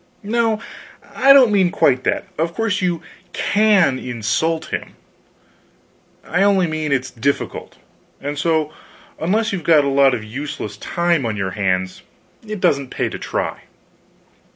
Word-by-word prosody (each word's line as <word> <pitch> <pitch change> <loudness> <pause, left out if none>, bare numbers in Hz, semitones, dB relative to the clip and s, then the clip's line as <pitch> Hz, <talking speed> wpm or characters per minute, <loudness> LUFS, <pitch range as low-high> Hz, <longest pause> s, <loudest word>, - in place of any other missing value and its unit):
No, 225 +1 0 0.5
I 275 - +5
don't 265 -5 +7
mean 190 -3 +3
quite 130 -6 +2
that; - - 0
of 165 +1 -1
course 225 -3 -1
you 175 -3 -1 0.3
can 200 -10 +3
insult 125 +7 -2
him, - - -5 1.3
I 180 +4 -1
only 195 -2 +4
mean 155 -2 -3
it's 130 -1 0
difficult; 135 +4 -3 0.4
and 145 +1 -4
so, 155 0 0 0.5
unless 215 +6 0
you've 180 -4 -3
got 150 -2 +4
a - - +1
lot 135 -1 +4
of 110 - -6
useless 110 -2 -6
time 170 - 0
on 110 -3 -2
your 95 -1 -2
hands 95 -2 -1 0.5
it 215 -1 -5
doesn't 140 -6 +1
pay - - -2
to - - -7
try. - - -3
155 Hz, 145 wpm, -19 LUFS, 130-195 Hz, 1.3 s, don't